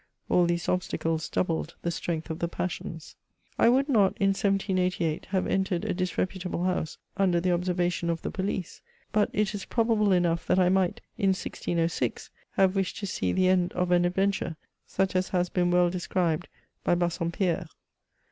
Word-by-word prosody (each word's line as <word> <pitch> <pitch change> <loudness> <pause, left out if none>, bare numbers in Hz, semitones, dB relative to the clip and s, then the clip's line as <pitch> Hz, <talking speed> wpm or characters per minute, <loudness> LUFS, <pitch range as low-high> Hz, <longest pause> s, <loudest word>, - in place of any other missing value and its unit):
All 175 -1 +4
these 170 -1 -1
obstacles 165 -3 -1
doubled 165 -2 -1
the 170 - 0
strength 165 -1 -3
of 160 - -5
the 170 - 0
passions. 165 -2 -5 0.4
I - - +6
would 265 +3 +3
not, 210 -9 +3
in 195 -3 +3
1788, 185 -4 0
have 190 -1 0
entered 190 -2 0
a - - 0
disreputable 185 0 -2
house, 180 -3 -1 0.2
under 185 -3 +3
the 180 +1 +1
observation 175 -1 0
of 165 -1 -2
the - - -3
police; 190 -2 -3 0.3
but 210 -1 +2
it 210 0 0
is 205 - -5
probable 225 -3 +2
enough 170 -2 +2
that - - +3
I 180 -1 +4
might, 185 -1 +1 0.2
in 195 -3 +3
1606, 170 -2 -2 0.2
have 190 0 +3
wished 195 -1 -1
to 205 - -4
see 95 - -1
the 185 - +2
end 180 -1 +2
of 180 0 0
an 175 0 +4
adventure, 190 -1 0 0.3
such 190 0 0
as 185 0 +1
has 180 -1 0
been 175 -1 +1
well 175 0 +4
described 175 -3 -1 0.4
by - - +3
Bassom 170 -1 -1
pierre. 175 -1 0
180 Hz, 175 wpm, -27 LUFS, 170-190 Hz, 0.4 s, I